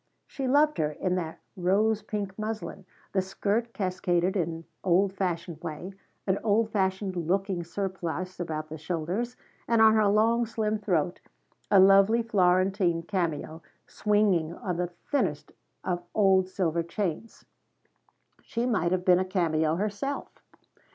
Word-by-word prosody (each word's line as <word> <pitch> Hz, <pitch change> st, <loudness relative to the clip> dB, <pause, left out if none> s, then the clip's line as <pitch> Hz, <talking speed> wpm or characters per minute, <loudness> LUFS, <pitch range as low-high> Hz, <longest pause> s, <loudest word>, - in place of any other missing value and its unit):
She 270 Hz, -2 st, -4 dB
loved 295 Hz, +3 st, +3 dB
her 150 Hz, -1 st, +2 dB
in 180 Hz, +4 st, -1 dB
that 165 Hz, -3 st, -4 dB, 0.2 s
rose 205 Hz, +4 st, +2 dB
pink 205 Hz, -2 st, -4 dB
muslin, 215 Hz, -2 st, -5 dB, 0.3 s
the 190 Hz, -, +3 dB
skirt 205 Hz, +5 st, -1 dB
cascaded 185 Hz, -3 st, 0 dB
in 165 Hz, -3 st, -2 dB, 0.2 s
old 190 Hz, +2 st, +3 dB
fashioned 175 Hz, -4 st, -3 dB
way, 170 Hz, +3 st, -6 dB, 0.3 s
an 190 Hz, 0 st, +1 dB
old 220 Hz, +1 st, +2 dB
fashioned 190 Hz, -1 st, 0 dB
looking 180 Hz, +1 st, -1 dB
surplice 185 Hz, 0 st, -4 dB
about 155 Hz, -3 st, -4 dB
the 155 Hz, 0 st, -7 dB
shoulders, 180 Hz, +9 st, -3 dB, 0.3 s
and 230 Hz, -1 st, +3 dB
on 220 Hz, 0 st, +7 dB
her 215 Hz, -1 st, +4 dB
long 225 Hz, +3 st, +3 dB
slim 215 Hz, -1 st, -1 dB
throat 175 Hz, -4 st, 0 dB, 0.5 s
a 195 Hz, -, +6 dB
lovely 195 Hz, +4 st, +6 dB
Florentine 185 Hz, -4 st, +2 dB
cameo 165 Hz, -3 st, -2 dB, 0.2 s
swinging 200 Hz, -6 st, +1 dB
on 180 Hz, -4 st, -4 dB
the 175 Hz, 0 st, 0 dB
thinnest 175 Hz, -, -2 dB, 0.3 s
of 175 Hz, -1 st, -1 dB
old 190 Hz, -3 st, +4 dB
silver 170 Hz, -3 st, 0 dB
chains. 185 Hz, +4 st, -4 dB, 1.0 s
She 235 Hz, +1 st, -3 dB
might 210 Hz, -9 st, +1 dB
have 185 Hz, -1 st, 0 dB
been 180 Hz, -1 st, +6 dB
a -, -, +2 dB
cameo 160 Hz, -4 st, +1 dB
herself. 210 Hz, +9 st, -3 dB
190 Hz, 135 wpm, -28 LUFS, 175-210 Hz, 1.0 s, on